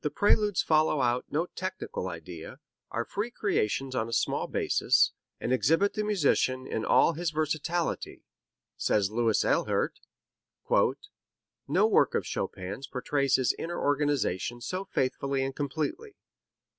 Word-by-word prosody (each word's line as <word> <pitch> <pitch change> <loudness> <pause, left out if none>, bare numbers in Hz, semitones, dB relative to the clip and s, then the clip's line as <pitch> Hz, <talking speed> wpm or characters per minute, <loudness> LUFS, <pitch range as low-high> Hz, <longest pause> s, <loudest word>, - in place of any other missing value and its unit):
"The 150 - +1
Preludes 205 +3 +2
follow 155 -1 +3
out 125 0 +1
no 160 +4 0
technical 180 - -5
idea, 85 -1 -8 0.3
are 120 0 -2
free 205 +4 -3
creations 135 - -1
on 115 -2 -1
a - - -5
small - - 0
basis, - - +2 0.3
and 125 - -1
exhibit 165 +10 +3
the 215 - -1
musician 140 -10 +1
in 110 - -3
all - - +4
his 170 +1 -1
versatility," 155 +2 -2 0.5
says 100 -2 +1
Louis 115 -1 +2
Ehlert. - - +1 1.7
"No - - +3
work - - +3
of - - 0
Chopin's 100 +9 -4
portrays 140 +1 +1
his 130 -2 +2
inner 175 +1 -4
organization 140 -6 0
so 185 +10 -4
faithfully 135 -3 -1
and 135 0 -3
completely. 160 - -3
140 Hz, 130 wpm, -29 LUFS, 120-170 Hz, 1.7 s, all